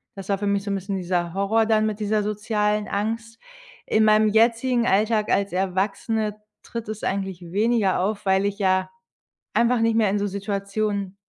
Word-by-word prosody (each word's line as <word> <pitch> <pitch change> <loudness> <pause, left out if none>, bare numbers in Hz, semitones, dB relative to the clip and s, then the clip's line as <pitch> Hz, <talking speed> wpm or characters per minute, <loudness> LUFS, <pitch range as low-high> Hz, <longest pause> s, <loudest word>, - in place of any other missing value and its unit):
das 195 -1 -9
war 200 - +2
für 205 +1 -3
mich 200 0 +1
so 200 - -4
'n - - 0
bisschen 195 +1 -3
dieser 175 -2 -2
Horror 200 +4 +2
dann 215 -1 +2
mit 215 -1 -2
dieser 210 0 0
sozialen 210 0 -1
Angst. 225 +2 -3 0.5
In 220 - +2
meinem 215 0 +5
jetzigen 230 +3 +2
Alltag 215 +1 +2
als 200 -2 +1
Erwachsene 200 +3 -1 0.3
tritt 230 -2 -6
es 215 -1 -6
eigentlich 190 -2 -2
weniger 210 -1 +2
auf, 205 +2 -2
weil 190 0 +2
ich 200 0 -2
ja 185 -1 +1 0.7
einfach 235 0 +3
nicht 225 0 +2
mehr 215 -3 +3
in 205 - 0
so 205 - -1
Situationen 200 0 -3
205 Hz, 180 wpm, -23 LUFS, 195-220 Hz, 0.7 s, meinem